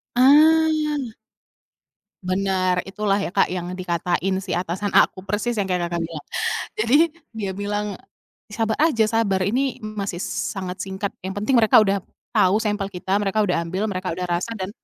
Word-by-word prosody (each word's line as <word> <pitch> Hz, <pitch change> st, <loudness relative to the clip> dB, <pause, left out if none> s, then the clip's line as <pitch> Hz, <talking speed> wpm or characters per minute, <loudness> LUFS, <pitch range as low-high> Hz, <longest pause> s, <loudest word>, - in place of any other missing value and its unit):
Ah. 300 Hz, 0 st, +4 dB, 1.1 s
Benar, 185 Hz, -1 st, 0 dB
itulah 200 Hz, 0 st, 0 dB
ya 195 Hz, -3 st, -3 dB
Kak -, -, +3 dB
yang 180 Hz, 0 st, -4 dB
dikatain 180 Hz, +1 st, -1 dB
si 185 Hz, -, -3 dB
atasan 185 Hz, +3 st, -2 dB
aku 185 Hz, -, +3 dB
persis 215 Hz, +4 st, -1 dB
yang 200 Hz, -, +1 dB
kayak 180 Hz, -2 st, -1 dB
Kakak 170 Hz, -1 st, -2 dB
bilang. 160 Hz, -3 st, -8 dB, 0.5 s
Jadi 230 Hz, +5 st, +4 dB, 0.4 s
dia 205 Hz, -3 st, -3 dB
bilang, 205 Hz, +2 st, -2 dB, 0.6 s
"Sabar 220 Hz, +1 st, -2 dB
aja, 230 Hz, -9 st, +3 dB
sabar, 200 Hz, -5 st, +1 dB
ini 250 Hz, +7 st, -1 dB
masih 200 Hz, -4 st, -4 dB
sangat 185 Hz, -2 st, -4 dB
singkat, 190 Hz, +2 st, -3 dB, 0.2 s
yang 190 Hz, -, -4 dB
penting 215 Hz, +6 st, +2 dB
mereka 220 Hz, -1 st, +6 dB
udah 200 Hz, -1 st, +1 dB, 0.3 s
tahu 200 Hz, +5 st, +3 dB
sampel 210 Hz, -2 st, -1 dB
kita, 190 Hz, +1 st, -1 dB
mereka 205 Hz, +1 st, +1 dB
udah 180 Hz, -4 st, +1 dB
ambil, 195 Hz, +5 st, -2 dB
mereka 185 Hz, -2 st, -3 dB
udah 180 Hz, -, -5 dB, 0.2 s
rasa, 230 Hz, +6 st, -5 dB
dan 190 Hz, -2 st, -4 dB
200 Hz, 160 wpm, -22 LUFS, 185-220 Hz, 1.1 s, mereka